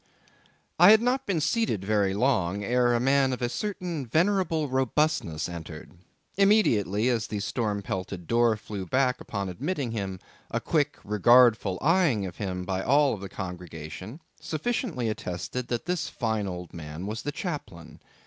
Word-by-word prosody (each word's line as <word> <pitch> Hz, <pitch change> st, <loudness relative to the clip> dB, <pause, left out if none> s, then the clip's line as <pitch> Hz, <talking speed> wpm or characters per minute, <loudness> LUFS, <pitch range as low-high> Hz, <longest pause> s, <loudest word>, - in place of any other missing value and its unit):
I 175 Hz, +3 st, +9 dB
had 220 Hz, +1 st, +8 dB
not 260 Hz, +2 st, 0 dB
been 185 Hz, -5 st, +1 dB
seated 155 Hz, -, 0 dB
very 100 Hz, -2 st, +1 dB
long 105 Hz, -5 st, +1 dB
ere 120 Hz, +2 st, +2 dB
a -, -, +2 dB
man 135 Hz, +1 st, +3 dB
of 125 Hz, -, -5 dB
a -, -, +2 dB
certain 170 Hz, -, -4 dB
venerable 165 Hz, -, +1 dB
robustness 130 Hz, -, 0 dB
entered; 85 Hz, -2 st, -8 dB, 0.5 s
immediately 120 Hz, -, +3 dB
as 115 Hz, -4 st, 0 dB
the 105 Hz, -, -3 dB
storm 105 Hz, -1 st, -2 dB
pelted 95 Hz, -2 st, -5 dB
door 115 Hz, +2 st, +3 dB
flew 100 Hz, -3 st, -6 dB
back 130 Hz, +4 st, +1 dB
upon 100 Hz, -2 st, -4 dB
admitting 135 Hz, -, -3 dB
him, 95 Hz, -4 st, -4 dB, 0.3 s
a -, -, -1 dB
quick -, -, 0 dB
regardful 110 Hz, -1 st, +4 dB
eyeing 155 Hz, -, +3 dB
of 90 Hz, -, -7 dB
him 90 Hz, -3 st, -3 dB
by 95 Hz, 0 st, -2 dB
all 140 Hz, +3 st, +3 dB
the 100 Hz, -1 st, -8 dB
congregation, 90 Hz, -, -7 dB, 0.2 s
sufficiently 165 Hz, -, -2 dB
attested 110 Hz, +4 st, -4 dB
that 120 Hz, +5 st, -3 dB
this 180 Hz, -2 st, -1 dB
fine 110 Hz, -4 st, -2 dB
old 90 Hz, -1 st, -6 dB
man 80 Hz, +2 st, -7 dB
was 110 Hz, +3 st, -4 dB
the 145 Hz, -, -3 dB
chaplain. 90 Hz, -, -6 dB
115 Hz, 155 wpm, -27 LUFS, 95-145 Hz, 0.5 s, I